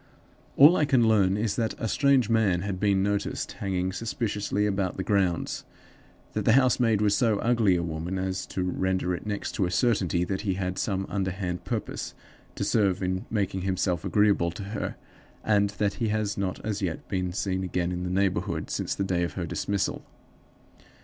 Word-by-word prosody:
"All 150 +6 +9
I 150 - +3
can 130 -5 +3
learn 100 -3 +3
is 110 0 0
that 115 -2 0
a 115 - -2
strange 135 0 +3
man 110 -6 +2
had 95 -1 -3
been 100 -1 +2
noticed 100 0 -1
hanging 95 -1 -2
suspiciously 105 -1 -1
about 95 -3 -1
the 95 - -2
grounds; 95 -3 0 0.7
that - - -1
the 110 - +4
housemaid 125 -4 +3
was 105 -1 +3
so 115 -4 +2
ugly 115 -4 +3
a 85 - 0
woman 85 +3 -3
as 95 0 -2
to 95 - -3
render 95 0 0
it 90 - -5
next 105 -1 -3
to 95 -4 0
a - - -3
certainty 95 -5 +1
that 95 +1 -2
he 100 -3 -1
had 90 -1 -3
some 95 -1 -1
underhand 95 -2 -3
purpose - - -4 0.4
to - - -2
serve 100 -3 +1
in 95 +1 -2
making 100 -3 -1
himself 90 -2 0
agreeable 105 -5 +3
to 90 +4 -7
her; 105 +2 -4 0.5
and 100 -2 +3
that 100 -1 +1
he 115 - +2
has 105 -1 -1
not 95 -2 -2
as 105 -1 -2
yet 85 -4 -3
been 90 -2 -2
seen 95 0 -2
again 90 -1 -1
in 90 0 -3
the 90 - -2
neighborhood 95 0 -1
since - - -2
the 100 - -1
day 90 -2 0
of 85 - -1
her 90 - -3
dismissal. 100 +4 -2
100 Hz, 190 wpm, -27 LUFS, 90-105 Hz, 0.7 s, All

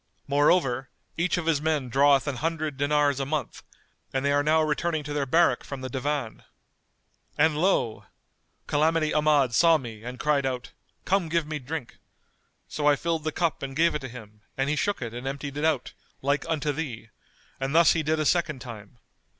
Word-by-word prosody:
Moreover, 140 -3 +2 0.3
each 175 +2 0
of 175 - -3
his 160 -3 +1
men 155 -4 0
draweth 140 +2 +4
an 140 -3 -3
hundred 155 0 -2
dinars 145 0 +2
a 135 - -1
month; 145 -4 -3 0.5
and 135 +1 -1
they 140 - +3
are 145 0 +3
now 155 +2 +3
returning 155 +1 -1
to 145 0 -5
their 145 -2 -1
barrack 170 +6 +3
from 140 -2 -7
the 130 - -5
Divan.' 135 -2 -3 1.0
And 155 +1 +3
lo! 155 - +1 0.6
Calamity 155 +1 +1
Ahmad 150 -5 +3
saw 165 +5 +5
me 115 -6 -9
and 125 +1 -7
cried 150 -2 +2
out, 125 -2 -3 0.3
'Come 185 -3 +1
give 165 -1 +1
me 155 0 -4
drink.' 140 -1 -6 0.7
So 150 -1 -1
I 145 - +6
filled 165 +1 -2
the 155 - 0
cup 170 0 -1
and 135 0 -5
gave 170 +2 +3
it 150 - -3
him, 110 -5 -10 0.2
and 135 +2 0
he - - +1
shook 205 -2 -1
it 115 -1 -6
and 120 +2 -6
emptied 140 +1 -5
it 145 +2 -1
out, 155 -6 0 0.3
like 140 +4 0
unto 150 -2 0
thee; 130 -7 -5 0.5
and 135 +3 -2
thus 170 0 +6
he 160 - 0
did 155 +1 0
a 155 - 0
second 170 -3 +1
time. 115 -3 -10
145 Hz, 190 wpm, -26 LUFS, 135-160 Hz, 1.0 s, I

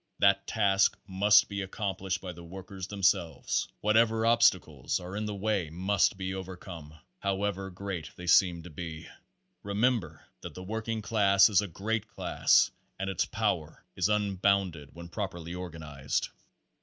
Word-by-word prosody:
That 100 0 +3
task 100 -3 +3
must 105 +2 +5
be 100 -1 -4
accomplished 95 -2 -3
by 90 -2 -6
the 85 0 -11
workers 95 +2 -8
themselves. 95 -4 0
Whatever 110 +1 +3
obstacles 95 - +2
are 90 +2 -7
in 105 0 -2
the 105 - -4
way 100 -4 -1
must 95 +4 +1
be 95 -1 -3
overcome, 90 -4 -8 0.2
however 100 0 -2
great 90 -4 -5
they 90 - -9
seem 85 -1 +4
to 90 - -10
be. 80 0 -7 0.5
Remember 100 - 0 0.2
that - - -8
the 90 - -7
working 110 +2 -3
class 100 -2 +5
is 105 -2 +4
a 100 - -4
great 105 +5 -2
class 110 - +3 0.3
and 95 0 -2
its 95 - 0
power 100 -8 -2
is 95 +2 +1
unbound 100 -3 +1
ed 75 -2 -11
when 85 0 -9
properly 85 -3 -5
organized. 80 -6 -4
95 Hz, 150 wpm, -29 LUFS, 85-105 Hz, 0.5 s, must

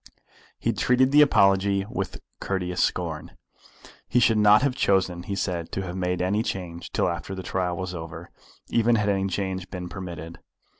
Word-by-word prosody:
He - - 0
treated 130 +1 +3
the 150 +1 +7
apology 100 -6 +4
with 105 -4 -5 0.2
courteous 90 -2 -2
scorn. 80 -4 -2 0.7
He 125 - +2
should 115 -2 +4
not 105 +3 +6
have 140 -2 +2
chosen, 95 -6 +1
he 100 +2 -4
said, 85 -4 -3
to 95 - -2
have 90 -1 -5
made 90 -1 -1
any 100 +4 +1
change 85 -6 -5
till - - +1
after 95 - -4
the 95 - -6
trial 90 -1 -2
was 95 -1 -4
over, 80 -1 -8 0.4
even 115 0 +3
had 105 -2 +1
any 95 -1 +1
change 95 -1 -3
been 90 -1 -6
permitted. 85 -3 -7
95 Hz, 170 wpm, -25 LUFS, 90-105 Hz, 0.7 s, the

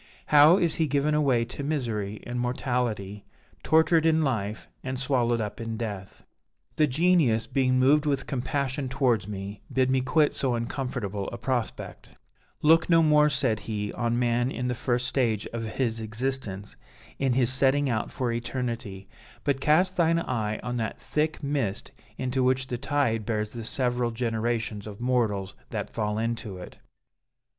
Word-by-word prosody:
How 150 +5 +8
is 170 -4 +1
he 160 - +3
given 145 +2 +1
away 135 -6 +2
to 125 +4 -7
misery 115 -8 -2
and 120 0 -4
mortality! 120 -5 -2 0.4
tortured 160 0 +4
in 160 -1 +3
life, 110 -6 -2 0.2
and 130 0 -4
swallowed 125 -3 +1
up 105 +1 -4
in 115 -1 -4
death.' 100 -4 -6 0.5
"The 155 - +4
Genius, 140 -6 +3
being 130 0 +1
moved 145 +4 +4
with 140 -2 0
compassion 135 +1 -2
towards 125 -7 +1
me, 100 0 -6
bid 130 0 +2
me 130 0 +2
quit 145 +4 +2
so 130 -3 0
uncomfortable 115 -5 -3
a 120 - -6
prospect: 120 -1 -4 0.5
'Look 165 +3 +5
no 165 -1 +6
more,' 150 -1 +5
said 130 -7 0
he, 105 -1 -3
'on 120 0 -1
man 120 0 +1
in 125 -2 -3
the - - 0
first 125 0 -1
stage 115 -6 0
of 115 -1 -4
his 115 -4 0
existence, 110 - -4 0.4
in 135 -2 +2
his 125 0 +3
setting 140 +2 +3
out 115 -4 -1
for 125 -4 -2
eternity; 115 -4 -4 0.4
but 140 -2 0
cast 180 +6 +3
thine 165 -1 +3
eye 110 -9 -1
on 125 0 -3
that 110 -2 -3
thick 155 0 -2
mist 140 -9 -2 0.3
into 130 0 -1
which 130 +1 +2
the 125 -1 -4
tide 125 -6 0
bears 105 -1 -2
the 115 -2 -7
several 125 -1 0
generations 115 -2 -2
of 105 -1 -9
mortals 115 -6 0 0.2
that - - -4
fall 105 -1 -2
into 115 -3 -3
it.' 90 - -10
125 Hz, 160 wpm, -27 LUFS, 110-140 Hz, 0.5 s, How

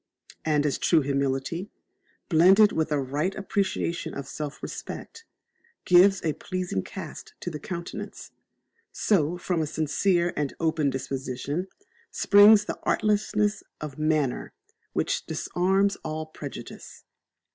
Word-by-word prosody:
And 150 -2 +2
as 145 - 0
true 165 -3 +4
humility, 140 +6 -1 0.6
blended 195 +5 +6
with 160 -1 -1
a 150 - +2
right 145 +8 -1
appreciation 195 -3 -2
of 140 -1 -6
self 150 +1 -6
respect, 455 0 -7 0.6
gives 180 +1 +5
a 155 - +1
pleasing 185 - -3
cast - - -9
to 175 - -4
the 150 - -6
countenance, 170 +2 -7 0.6
so 175 -4 +1
from 175 -1 -1
a 155 - -1
sincere 170 +4 +1
and 145 -2 -2
open 160 -3 +1
disposition 135 +5 -3 0.4
springs 205 +1 +6
that - - -5
artlessness 210 0 +1 0.2
of 150 -1 -7
manner 155 -4 0 0.4
which - - -1
disarms 195 +3 +1
all 155 0 -5
prejudice. 150 -3 -9
160 Hz, 120 wpm, -26 LUFS, 145-190 Hz, 0.6 s, blended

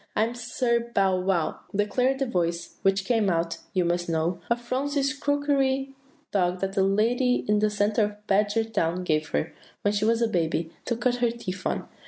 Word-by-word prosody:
"'I 215 - +3
am 230 +2 -1
Sir 235 -1 -1
Bow 190 -2 +3
wow,' 180 -3 0 0.2
declared 250 +6 +1
the 270 - 0
voice, 170 -7 -2
which 195 0 +2
came 220 -2 +2
out, 165 -1 -1
you 185 -2 +1
must 175 0 0
know, 165 +2 0
of 235 0 +2
Phronsie's 275 +3 -1
crockery 275 -2 0 0.4
dog 180 -2 +1
that 195 0 -2
a 195 - +3
lady 230 +6 +2
in 210 0 +3
the 215 0 +3
centre 210 +1 +2
of 210 0 -9
Badgertown 205 -3 +1
gave 155 -3 0
her, 75 0 -1 0.3
when 205 - +2
she 205 +1 +1
was 230 +1 +3
a - - +3
baby, 165 -4 -1
to 235 - 0
cut 245 0 +1
her 240 -1 +2
teeth 195 -5 -5
on. - - -2
210 Hz, 190 wpm, -26 LUFS, 180-240 Hz, 0.4 s, I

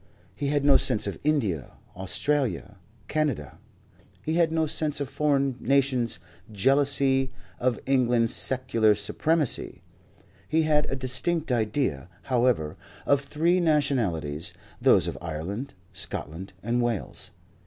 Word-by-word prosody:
He 140 - -2
had 145 0 +1
no 140 -1 +7
sense 105 - +2
of 100 - -4
India, 110 - 0 0.2
Australia, 105 +1 -1 0.3
Canada. 145 - -2 0.6
He 160 - -1
had 165 -1 +3
no 160 -1 +1
sense 150 -1 0
of 140 - -2
foreign 140 -4 +1
nations' 130 -4 +1 0.3
jealousy 135 +3 +2 0.3
of 125 -2 0
England's 120 -3 +2
secular 115 -5 +2
supremacy. 150 +8 0 0.7
He 160 +2 +2
had 150 -1 +2
a - - -1
distinct 135 +5 -1
idea, 110 - -1
however, 120 - +1 0.3
of 140 -1 +3
three 165 +5 +1
nationalities; 120 - 0 0.3
those - - +5
of - - -4
Ireland, 90 - -5 0.2
Scotland 90 +5 -5
and 120 +2 0
Wales. 120 -5 -2
130 Hz, 120 wpm, -26 LUFS, 105-145 Hz, 0.7 s, no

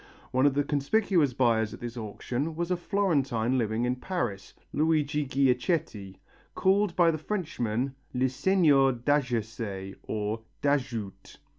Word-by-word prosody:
One 130 +2 +4
of 140 - +1
the 145 - +2
conspicuous 145 - +1
buyers 115 -4 +2
at - - -15
this 120 0 -6
auction 120 +7 -4
was 170 +2 -2
a - - +3
Florentine 140 - 0
living 115 +1 0
in 125 +1 0
Paris, 120 - -4 0.2
Luigi 150 -1 +1
Ghiacceti, 130 - 0 0.4
called 195 -1 +2
by 170 -2 +5
the 155 - -3
Frenchmen 135 - -2 0.2
le 130 +1 +1
seigneur 140 -2 +3
d'Adjacet 115 -7 -2
or 110 +1 -3 0.2
d'Adjoute. 125 -8 -2
135 Hz, 130 wpm, -28 LUFS, 115-155 Hz, 0.4 s, by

